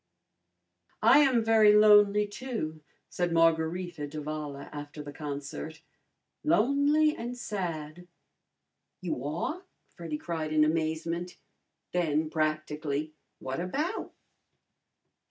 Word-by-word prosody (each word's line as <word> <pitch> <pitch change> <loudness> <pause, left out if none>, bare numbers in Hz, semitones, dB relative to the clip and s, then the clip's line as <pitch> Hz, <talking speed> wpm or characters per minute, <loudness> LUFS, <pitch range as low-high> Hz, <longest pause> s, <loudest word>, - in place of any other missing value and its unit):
"I - - +7
am 260 -6 +4
very 220 -2 +6
lonely, 210 -1 +6
too," 205 -8 -5 0.3
said 175 -1 -2
Margarita 165 0 +1
d'Avala 150 -1 -6
after 145 0 -8
the 145 0 -9
concert 145 +1 -6 0.6
"lonely 295 +3 +3
and 240 +2 -6
sad." 175 -6 -5 0.9
"You 165 -8 -3
are?" 170 - -3 0.3
Freddy 165 -3 -6
cried 160 -1 -4
in 155 0 +5
amazement. 165 +2 -2 0.5
Then, 155 -3 0
practically, 155 -1 -2 0.2
"What 130 +1 -5
about?" 295 - -3
165 Hz, 95 wpm, -29 LUFS, 155-210 Hz, 0.9 s, I